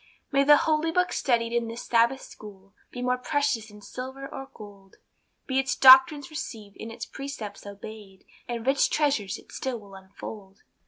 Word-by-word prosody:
May 275 0 +4
the 295 +1 +7
Holy 310 +1 +1
Book 360 +2 +1
studied 235 -3 +1
in 235 -1 0
this 230 +1 -6
Sabbath 235 +3 +2
School, 195 -2 -13 0.2
Be 245 - -6
more 250 0 +1
precious 285 -4 0
than 210 -1 -15
silver 265 +4 -7
or 270 0 -8
gold; 200 -2 -14 0.5
Be 265 0 0
its 265 - 0
doctrines 265 +2 +7
received, 225 -10 -7
and 225 - -7
its 230 0 -6
precepts 230 -8 -7
obeyed, 200 -1 -11 0.2
And 235 -1 -4
rich 275 +1 +3
treasures 275 -11 0
it - - -17
still 260 -2 -3
will 200 -2 -15
unfold. 195 +1 -11
235 Hz, 170 wpm, -26 LUFS, 210-275 Hz, 0.5 s, the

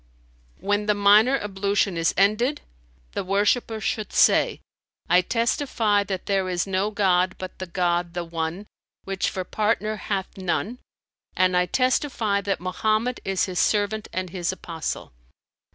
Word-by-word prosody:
When 205 +3 0
the 210 - +3
minor 210 +6 +5
ablution 200 -2 -1
is 165 0 +2
ended, 215 +9 +2 0.5
the - - -3
worshipper 205 +4 +1
should 215 0 -3
say, - - +4 0.5
I 180 +1 +5
testify 230 -1 +1
that 190 -2 -4
there 195 -2 0
is 175 -1 0
no 195 +1 0
god 185 -3 +2
but 185 0 -8
the 185 - -5
God, 175 -1 -1
the 175 - -2
One, 165 +3 -4 0.4
which 195 -1 -1
for 185 - -4
partner 215 +2 -1
hath 195 -2 -4
none, 190 +7 -2 0.6
and 185 0 +3
I 180 0 +2
testify 250 - +1
that 200 0 -2
Mohammed 215 +7 0
is 190 -1 0
His 185 -2 -3
servant 210 +1 +1
and 185 -2 -4
His 175 -2 -2
apostle. 165 -3 -5
195 Hz, 145 wpm, -24 LUFS, 185-215 Hz, 0.6 s, minor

